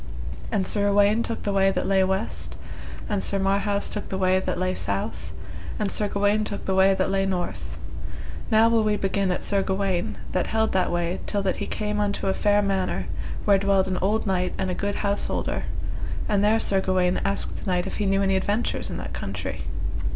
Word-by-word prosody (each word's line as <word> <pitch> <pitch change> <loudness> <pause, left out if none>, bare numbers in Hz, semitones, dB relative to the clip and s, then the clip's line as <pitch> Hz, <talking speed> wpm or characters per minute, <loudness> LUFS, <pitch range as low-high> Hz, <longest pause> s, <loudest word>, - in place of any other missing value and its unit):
And 195 -3 +1
Sir 205 0 +1
Uwaine 205 +2 +4
took 230 -1 -3
the 205 - 0
way 195 0 +4
that 195 - -1
lay 195 -1 +3
west, 190 +3 -2 0.5
and 205 -3 0
Sir 200 - 0
Marhaus 200 +1 +1
took 210 - -4
the 190 - -2
way 185 0 +3
that - - -2
lay 185 +1 0
south, 100 - -3 0.5
and 205 -2 -1
Sir 210 - +1
Gawaine 205 +1 +2
took 205 -1 -4
the 190 - 0
way 190 +1 +5
that 190 - 0
lay 195 0 +2
north. 180 -2 -3 0.7
Now 220 0 +6
will 230 -1 +4
we 210 -1 +2
begin 195 -1 0
at 180 - -2
Sir 200 -1 +1
Gawaine, 190 -2 -1
that 185 - 0
held 220 0 +1
that 185 - +2
way 175 +1 -1
till 205 -1 0
that 190 - 0
he - - -3
came 210 -1 -2
unto 205 -1 0
a 190 - +2
fair 205 +1 +3
manor, 195 -2 0 0.4
where 200 -2 +5
dwelled 195 -1 +3
an 185 -1 -1
old 215 +4 +1
knight 185 -2 0
and 190 -1 -1
a - - -1
good 200 +2 -2
householder, 200 0 -1 0.6
and 205 -1 +2
there 215 +2 +4
Sir 195 -3 +2
Gawaine 185 -1 +1
asked 195 0 +1
the - - -8
knight 180 0 +1
if - - -4
he 205 - 0
knew 195 0 +2
any 195 0 +2
adventures 205 +5 0
in - - -4
that - - -6
country. - - -4
195 Hz, 210 wpm, -25 LUFS, 190-205 Hz, 0.7 s, Now